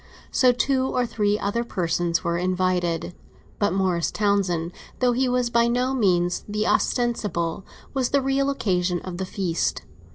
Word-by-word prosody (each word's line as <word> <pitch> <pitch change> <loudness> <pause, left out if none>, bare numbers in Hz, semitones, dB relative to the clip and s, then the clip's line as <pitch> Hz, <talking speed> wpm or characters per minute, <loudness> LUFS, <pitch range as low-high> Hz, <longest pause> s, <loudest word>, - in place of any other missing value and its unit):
So 255 -2 +5
two 260 +1 +1
or 250 -1 0
three 210 -2 0
other 210 +3 -1
persons 175 -5 -1
were 170 0 0
invited; 180 -2 0 0.5
but 205 - +2
Morris 185 -3 +1
Townsend, 190 -5 0 0.3
though 250 -1 +2
he 255 +1 +1
was 245 -1 0
by 235 0 +3
no 250 +2 +1
means 180 -7 +1
the 210 +1 -1
ostensible, 205 -11 0 0.3
was 260 -3 0
the 280 - +3
real, 270 +1 +1
occasion 180 -9 0
of 180 -2 -6
the 190 - -2
feast. 180 -4 -1
200 Hz, 155 wpm, -24 LUFS, 180-245 Hz, 0.5 s, So